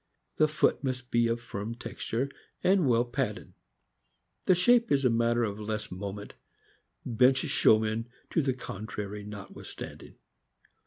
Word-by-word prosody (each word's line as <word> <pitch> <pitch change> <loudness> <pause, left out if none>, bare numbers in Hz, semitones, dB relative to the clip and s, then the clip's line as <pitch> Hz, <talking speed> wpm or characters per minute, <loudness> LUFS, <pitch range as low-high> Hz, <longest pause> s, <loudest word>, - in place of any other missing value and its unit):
The 155 - +5
foot 150 0 +1
must 130 -2 -3
be 120 0 +3
of 115 +1 0
firm 115 -1 -5
texture, 120 +1 -3 0.4
and 185 -5 +4
well 120 0 +4
padded; 120 -3 -3 0.9
the 185 - +5
shape 235 +5 +4
is 140 -1 +3
a 125 - +5
matter 115 +1 +2
of 105 -2 -2
less 105 0 -4
moment, 100 +2 -6 0.7
bench 125 +3 +4
show 110 - +4
men 110 +2 -2 0.2
to 165 - +3
the 135 -3 0
contrary 105 -3 -6
notwithstanding. 100 -1 -9
115 Hz, 140 wpm, -29 LUFS, 105-130 Hz, 0.9 s, The